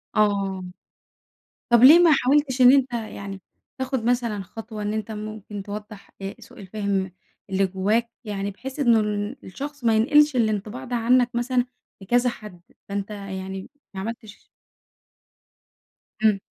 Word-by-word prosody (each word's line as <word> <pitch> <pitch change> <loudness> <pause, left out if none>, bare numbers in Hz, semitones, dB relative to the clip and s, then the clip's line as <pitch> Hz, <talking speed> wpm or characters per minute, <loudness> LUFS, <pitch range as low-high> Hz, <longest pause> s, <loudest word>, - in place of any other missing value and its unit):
آه. 200 -3 +1 1.1
طب 235 0 +5
ليه 310 +7 +10
ما 345 -2 +6
حاولتش 275 -1 +2
إن 250 0 +9
أنتَ 265 -2 +3
يعني 200 -4 -5 0.4
تاخُد 260 -2 -2
مثلًا 235 -4 0
خطوة 215 +3 -8
إن 210 +1 -2
أنتَ 220 0 -3
ممكن 210 -1 -7
توضّح 210 0 -8
آآ، 195 0 -5
سوء - - -15
الفهم 195 -1 -2 0.4
اللي 195 0 +2
جوّاك؟ 210 +5 0 0.2
يعني 200 -1 -3
بحيث 265 +8 -8
إنه 235 -5 +5
ال 210 +3 -2
الشخص 285 +8 -7
ما 225 -1 +3
ينقِلِش 295 +5 +4
الانطباع 215 +1 -1
ده 245 -1 -3
عنَّك 245 +1 +3
مثلًا 245 +1 +1 0.4
لكذا 245 +5 +2
حد، 210 -7 -10 0.3
فأنتَ 200 0 -3
يعني 190 -1 -6 0.2
ما 190 - -6
عمَلتِش 220 0 -8 1.8
إمم. 210 -3 +4
215 Hz, 140 wpm, -24 LUFS, 200-245 Hz, 1.8 s, ليه